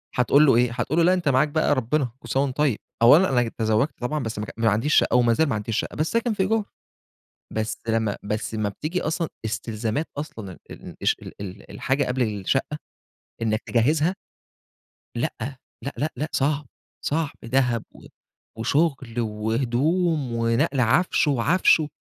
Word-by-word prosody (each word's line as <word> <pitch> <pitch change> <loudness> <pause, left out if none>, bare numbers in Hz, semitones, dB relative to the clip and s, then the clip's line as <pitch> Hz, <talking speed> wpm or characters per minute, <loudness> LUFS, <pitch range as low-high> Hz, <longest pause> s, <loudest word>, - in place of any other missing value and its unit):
هتقول 140 +4 +5
له 135 - +5
إيه؟ 120 0 +3
هتقول 130 +5 -2
له 170 - +5
لأ، 180 +2 +5
أنتَ 175 -5 +1
معاك 130 +2 +3
بقى 150 -1 +1
ربنا 130 +1 0
كل - - -12
سنة 135 - +2
وأنتَ 135 -1 -3
طيب. 145 -7 +2 0.2
أولًا 155 +11 +7
أنا 125 -2 +3
ج 115 - -3
تزوَّجت 110 +5 0
طبعًا 145 +4 -1
بس 110 -2 -4
ماك 105 - -5
ما 115 -1 +3
عنديش 115 +9 +1
شقة، - - +4
ومازال 125 +5 +3
ما 125 - 0
عنديش 110 +1 -2
شقة. - - -4
بس 155 +1 -1
ساكن 230 0 +1
في 195 - 0
إيجار. 220 +3 +1 0.9
بس 110 0 -2
لمّا 110 -3 +1
بس 105 +2 -3
أمّا 110 -1 0
بتيجي 155 - -3
أصلًا 160 +1 -1 0.2
إستلزامات 110 +5 -2
أصلًا 110 - -7
ال - - -10
الش - - +2
ال 100 -1 -9
الحاجة 140 +2 0
قبل 125 0 -1
الشقة، 115 +7 -1 0.6
إنك 110 -1 +1
تجهزها. 150 +9 +2 1.0
لأ، 115 - -1 0.5
لأ، 140 - -3
لأ، 155 +2 -2
لأ، 150 - -2
صعب، 145 +1 0 0.4
صعب. 155 0 0
دهب، 120 -1 +1
و - - -15 0.5
وشغل، 130 -2 0
وهدوم 125 +8 0
ونقل 115 +5 +1
عفش، 150 +7 +3
وعفش 145 - +4
و 155 - -1
130 Hz, 170 wpm, -24 LUFS, 115-150 Hz, 1.0 s, أولًا